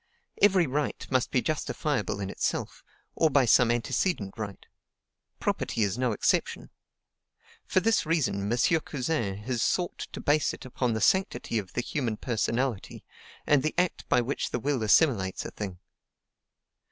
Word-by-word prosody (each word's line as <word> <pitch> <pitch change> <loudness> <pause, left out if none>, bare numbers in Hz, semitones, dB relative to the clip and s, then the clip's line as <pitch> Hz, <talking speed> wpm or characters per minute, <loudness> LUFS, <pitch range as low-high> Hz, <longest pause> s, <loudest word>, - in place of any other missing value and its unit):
Every 190 -4 +5
right 145 +1 -2
must 130 -1 +2
be 125 - +1
justifiable 150 -7 -2
in 100 0 -3
itself, - - -3 0.3
or 160 - +3
by 140 -2 +4
some 120 +1 +5
antecedent 120 - 0
right; 105 -3 -7 0.7
property 110 - -1
is 100 -1 0
no 125 0 0
exception. 105 - 0 1.0
For 185 - +2
this 225 +3 +2
reason, 125 -11 0
M. 120 - +1 0.2
Cousin 130 -10 -2
has 120 0 -2
sought 180 -1 0
to - - -7
base 150 +1 +1
it - - -13
upon 125 -1 -1
the 110 - -2
SANCTITY 190 - +1
of 95 -3 -8
the - - 0
human 120 -4 -2
personality, 120 0 -2 0.4
and 145 -2 +4
the 155 - -2
act 180 -1 0
by - - +4
which 130 +4 -2
the 125 - -2
will 140 0 -1
assimilates 105 - +2
a - - -5
thing. 95 -4 -6
125 Hz, 155 wpm, -28 LUFS, 110-150 Hz, 1.0 s, Every